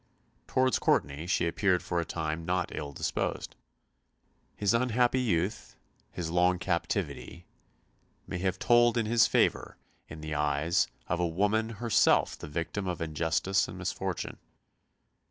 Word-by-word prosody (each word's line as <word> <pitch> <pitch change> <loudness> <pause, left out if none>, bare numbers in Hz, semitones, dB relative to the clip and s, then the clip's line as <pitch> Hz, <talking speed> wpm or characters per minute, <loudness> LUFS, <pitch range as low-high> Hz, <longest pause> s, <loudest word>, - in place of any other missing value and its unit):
Towards 130 0 +2
Courtenay 75 +4 0
she 90 -1 +1
appeared 90 +2 +1
for 85 - -1
a 85 - -1
time 80 0 -3
not 90 +1 -1
ill 75 -1 -5
disposed. 70 - -3 1.0
His 100 0 +1
unhappy 125 +1 +2
youth, 100 -4 -1 0.4
his 85 -2 -4
long 90 +1 +3
captivity, 85 0 -3 0.8
may 90 - -5
have 95 0 -1
told 120 +2 +4
in 115 - +1
his 115 +1 +4
favour - - +1 0.3
in 75 0 -9
the 75 0 -5
eyes 75 +3 +1 0.2
of 90 - -1
a 90 - +1
woman 105 +6 +1
herself 115 0 +3
the - - -9
victim 85 +6 -3
of 90 -2 -3
injustice 80 +4 0
and - - -8
misfortune. - - -4
90 Hz, 135 wpm, -29 LUFS, 80-110 Hz, 1.0 s, told